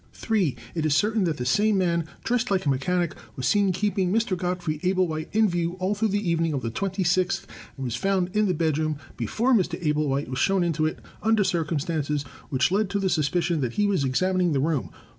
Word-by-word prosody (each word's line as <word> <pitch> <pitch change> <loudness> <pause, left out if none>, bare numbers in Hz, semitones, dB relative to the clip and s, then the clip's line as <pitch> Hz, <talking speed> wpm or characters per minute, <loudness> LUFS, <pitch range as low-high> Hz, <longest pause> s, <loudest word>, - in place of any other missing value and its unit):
(3) 200 - 0 0.2
It 160 - -2
is 155 -2 +2
certain 210 +2 +2
that 160 -3 -1
this 125 +1 0
same 210 +3 +3
man, 170 -3 +1 0.2
dressed 245 0 0
like 190 -3 +1
a - - +2
mechanic, 170 +6 0 0.2
was 130 - -4
seen 200 +6 +3
keeping 190 -1 0
Mr. 220 -2 +1
Godfrey 175 -4 -2
Ablewhite 180 -4 0
in 220 0 +4
view 175 -2 -1
all 185 +2 -1
through 215 +2 0
the 205 -1 -1
evening 165 -1 +1
of 135 - -2
the 115 - -2
twenty 190 - -2
sixth, 180 +2 +1 0.3
and 135 - -5
was 120 -3 -2
found 190 +4 0
in 210 0 +3
the 180 - +1
bed 155 -1 +1
room 155 -1 -1 0.2
(before 220 - 0
Mr. 180 -6 +1
Ablewhite 150 -3 0
was 130 +1 -4
shown 195 -2 +2
into 160 -2 +1
it) 155 - -4 0.2
under 220 -1 +3
circumstances 155 -4 -1 0.3
which 130 +4 +1
lead 205 +1 +1
to 200 - -1
the 190 -2 0
suspicion 165 +1 +1
that 125 -3 -1
he 205 - +1
was 195 -7 +1
examining 180 +6 +1
the 140 - +1
room. 150 -1 0
175 Hz, 215 wpm, -25 LUFS, 155-195 Hz, 0.3 s, in